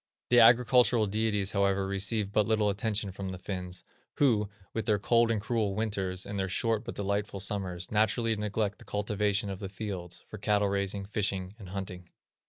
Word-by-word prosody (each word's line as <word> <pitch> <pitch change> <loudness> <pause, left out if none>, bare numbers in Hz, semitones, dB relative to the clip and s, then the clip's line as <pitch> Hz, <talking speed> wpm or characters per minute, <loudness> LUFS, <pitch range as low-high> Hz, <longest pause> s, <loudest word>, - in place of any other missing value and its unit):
The 120 - +7
agricultural 120 -1 +6
deities, 105 -1 +1
however, 100 -1 +1
receive 100 +1 -1
but 105 -1 +2
little 110 -2 +2
attention 105 0 -2
from 95 0 -5
the 95 - -5
Finns, 90 -1 -5 0.3
who, 110 -8 +3 0.2
with 115 - -3
their 105 -2 +3
cold 115 +3 +3
and 115 -2 +1
cruel 105 -2 -1
winters, 95 -4 -2
and 100 -1 -4
their 95 0 -1
short 115 +3 0
but - - -6
delightful 100 0 -2
summers, 95 -3 -3
naturally 110 +2 +2
neglect 105 -1 -2
the - - -13
cultivation 105 -1 0
of 95 - -6
the 100 -2 -5
fields, 95 -4 -5
for 110 - -9
cattle 105 -1 +2
raising, 100 0 -1
fishing, 95 -2 -2
and 95 -4 -10
hunting. 90 -2 -6
100 Hz, 180 wpm, -30 LUFS, 95-110 Hz, 0.3 s, The